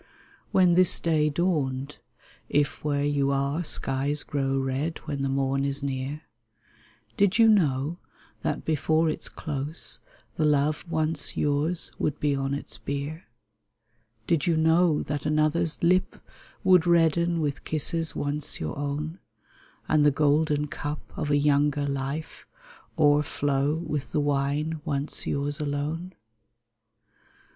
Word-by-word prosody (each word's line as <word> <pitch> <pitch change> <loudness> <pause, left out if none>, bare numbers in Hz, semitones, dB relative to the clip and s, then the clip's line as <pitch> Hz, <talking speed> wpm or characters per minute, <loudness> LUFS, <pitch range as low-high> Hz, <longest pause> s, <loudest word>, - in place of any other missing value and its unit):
When 180 -2 +5
this 180 0 +5
day 155 -2 +2
dawned 145 -4 -1 0.5
(if 145 -1 0
where 145 -1 0
you 145 -1 +1
are 140 +4 0
Skies 140 -1 0
grow 135 -1 -1
red 135 +4 -1
when 140 -2 -3
the 135 - 0
morn 135 0 0
is 140 0 0
near) 140 +2 -3 0.9
Did 200 0 +3
you 225 -1 +6
know 160 -6 +2 0.4
that - - -2
before 160 +1 +2
its - - -4
close 150 +2 -4 0.4
The 160 - +1
love 150 0 +2
once 155 -2 -1
yours 150 +4 0
would 150 - -1
be 145 -1 +1
on 135 0 -1
its 140 - -7
bier? 145 +4 -5 1.0
Did 160 +2 +1
you 165 -2 +2
know 160 0 +3
that 145 0 -3
another's 155 +2 +1
lip 185 +2 +2 0.5
Would 180 -3 +5
redden 170 0 +3
with 145 -2 -2
kisses 160 +1 0
once 145 +1 -2
your 80 -1 -4
own, 150 +4 -3 0.7
And 155 -1 +3
the 145 - +6
golden 150 +1 +2
cup 145 0 -6
of 150 - -3
a 145 - +3
younger 145 0 +2
life 140 +3 -4 0.5
O'erflow 145 -1 +2
with 155 -4 -4
the - - +2
wine 145 +2 0
once 145 -2 -2
yours 145 +2 -1
alone 150 +5 -3
150 Hz, 130 wpm, -26 LUFS, 140-160 Hz, 1.0 s, you